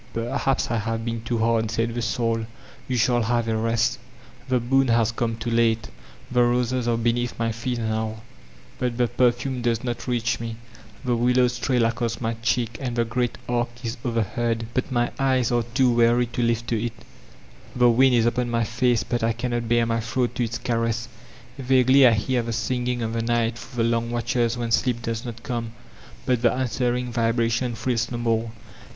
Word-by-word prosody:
^'Perhaps 120 Hz, +2 st, 0 dB
I 115 Hz, -, +1 dB
have 115 Hz, +1 st, -3 dB
been 115 Hz, -1 st, -3 dB
too 115 Hz, +1 st, -2 dB
hard/* 115 Hz, 0 st, +1 dB
said 115 Hz, +1 st, -1 dB
the 120 Hz, -, -2 dB
Soul; 115 Hz, -1 st, -1 dB, 0.4 s
''you 125 Hz, -, 0 dB
shall 120 Hz, +1 st, +3 dB
have 115 Hz, 0 st, 0 dB
a 110 Hz, -, 0 dB
rest" 115 Hz, +1 st, +1 dB, 0.5 s
The 130 Hz, -1 st, +3 dB
boon 135 Hz, +3 st, +2 dB
has 115 Hz, -1 st, +3 dB
come 115 Hz, 0 st, -2 dB
too 115 Hz, +1 st, -4 dB
late. 115 Hz, -1 st, +2 dB, 0.4 s
The 125 Hz, -1 st, +3 dB
roses 120 Hz, 0 st, +1 dB
are 115 Hz, -1 st, +2 dB
be 115 Hz, 0 st, +2 dB
neath 120 Hz, 0 st, -3 dB
my 115 Hz, 0 st, 0 dB
feet 120 Hz, +2 st, -3 dB
now, 110 Hz, -1 st, -2 dB, 0.6 s
but 125 Hz, -2 st, -1 dB
the 120 Hz, -1 st, +2 dB
perfume 125 Hz, +1 st, +1 dB
does 115 Hz, -1 st, 0 dB
not 120 Hz, 0 st, -4 dB
reach 120 Hz, -1 st, 0 dB
me; 115 Hz, -1 st, -5 dB, 0.5 s
the 125 Hz, -1 st, +2 dB
willows 125 Hz, +1 st, +2 dB
trail 125 Hz, -2 st, +2 dB
across 115 Hz, 0 st, -1 dB
my 115 Hz, -1 st, -1 dB
cheek 115 Hz, -1 st, 0 dB
and 125 Hz, -3 st, -3 dB
the 120 Hz, -1 st, +1 dB
great 120 Hz, +2 st, -1 dB
arch 120 Hz, 0 st, 0 dB
is 115 Hz, 0 st, -3 dB
overhead, 115 Hz, 0 st, -1 dB
but 130 Hz, +1 st, -1 dB
my 120 Hz, -1 st, +1 dB
eyes 130 Hz, -3 st, +2 dB
are 120 Hz, 0 st, +2 dB
too 125 Hz, +2 st, +2 dB
weary 120 Hz, +1 st, +4 dB
to 120 Hz, +1 st, -4 dB
lift 115 Hz, 0 st, 0 dB
to 115 Hz, -2 st, 0 dB
it; 120 Hz, -, -6 dB, 0.7 s
the 125 Hz, 0 st, +5 dB
wind 130 Hz, +2 st, +4 dB
is 115 Hz, -1 st, +3 dB
upon 120 Hz, +1 st, 0 dB
my 115 Hz, 0 st, +1 dB
face, 120 Hz, +1 st, +1 dB
but 120 Hz, -1 st, -2 dB
I 115 Hz, 0 st, +1 dB
cannot 120 Hz, -1 st, -3 dB
bare 120 Hz, 0 st, +3 dB
my 115 Hz, 0 st, 0 dB
throat 120 Hz, +2 st, -1 dB
to 125 Hz, -, -1 dB
its 115 Hz, 0 st, -2 dB
caress; 115 Hz, -1 st, -1 dB, 0.5 s
vaguely 130 Hz, +1 st, +5 dB
I 120 Hz, -, +5 dB
hear 120 Hz, +4 st, 0 dB
the 115 Hz, 0 st, -4 dB
singing 125 Hz, +1 st, -1 dB
of 115 Hz, 0 st, -2 dB
the 115 Hz, -, -1 dB
Night 120 Hz, 0 st, 0 dB
through 120 Hz, +2 st, -3 dB
the 115 Hz, -, +2 dB
long 115 Hz, 0 st, 0 dB
watches 120 Hz, 0 st, 0 dB
when 120 Hz, -1 st, -3 dB
sleep 120 Hz, 0 st, +1 dB
does 115 Hz, 0 st, -3 dB
not 115 Hz, -2 st, -8 dB
come, 115 Hz, -2 st, -4 dB, 0.5 s
but 125 Hz, -3 st, +1 dB
the 120 Hz, -2 st, +4 dB
an 130 Hz, +1 st, -1 dB
swering 125 Hz, 0 st, -1 dB
vibration 115 Hz, +1 st, 0 dB
thrills 120 Hz, 0 st, -1 dB
no 120 Hz, -, -4 dB
more. 115 Hz, -1 st, 0 dB
120 Hz, 200 wpm, -24 LUFS, 115-125 Hz, 0.7 s, the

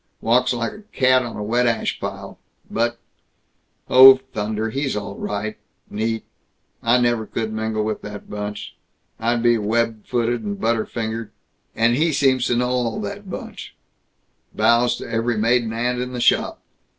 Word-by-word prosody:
Walks 125 Hz, +3 st, +2 dB
like 120 Hz, -2 st, -2 dB
a 210 Hz, -, -12 dB
cat 130 Hz, -1 st, +4 dB
on 120 Hz, -2 st, -6 dB
a 105 Hz, -, -4 dB
wet 120 Hz, +3 st, +1 dB
ash 115 Hz, -2 st, -1 dB
pile. -, -, -7 dB, 0.3 s
But 120 Hz, +1 st, 0 dB, 0.9 s
Oh 130 Hz, +1 st, +10 dB, 0.2 s
thunder, 110 Hz, +1 st, -2 dB
he's 135 Hz, 0 st, -2 dB
all 100 Hz, -1 st, -5 dB
right. 105 Hz, +2 st, -4 dB, 0.3 s
Neat. 110 Hz, +2 st, -2 dB, 0.6 s
I 120 Hz, +2 st, +3 dB
never 120 Hz, -2 st, +1 dB
could 110 Hz, -1 st, -3 dB
mingle 110 Hz, 0 st, -1 dB
with 110 Hz, 0 st, -3 dB
that 105 Hz, -1 st, -9 dB
bunch. 105 Hz, 0 st, -6 dB, 0.4 s
I'd 115 Hz, +1 st, 0 dB
be 120 Hz, -1 st, +4 dB
web 110 Hz, +1 st, -1 dB
footed 120 Hz, -1 st, 0 dB
and 100 Hz, -2 st, -5 dB
butter 115 Hz, 0 st, 0 dB
fingered. 115 Hz, -1 st, -4 dB, 0.5 s
And 115 Hz, +1 st, +3 dB
he 160 Hz, +4 st, +2 dB
seems 130 Hz, -3 st, +2 dB
to 120 Hz, -, +1 dB
know 125 Hz, +1 st, +1 dB
all 125 Hz, -, -1 dB
that 200 Hz, -1 st, -6 dB
bunch -, -, -8 dB, 0.8 s
bows 120 Hz, +1 st, +3 dB
to -, -, -8 dB
every 115 Hz, 0 st, -1 dB
maiden 115 Hz, +1 st, +2 dB
aunt 125 Hz, +2 st, -1 dB
in 125 Hz, 0 st, -5 dB
the 125 Hz, -, -4 dB
shop. -, -, +2 dB
115 Hz, 165 wpm, -21 LUFS, 110-125 Hz, 0.9 s, Oh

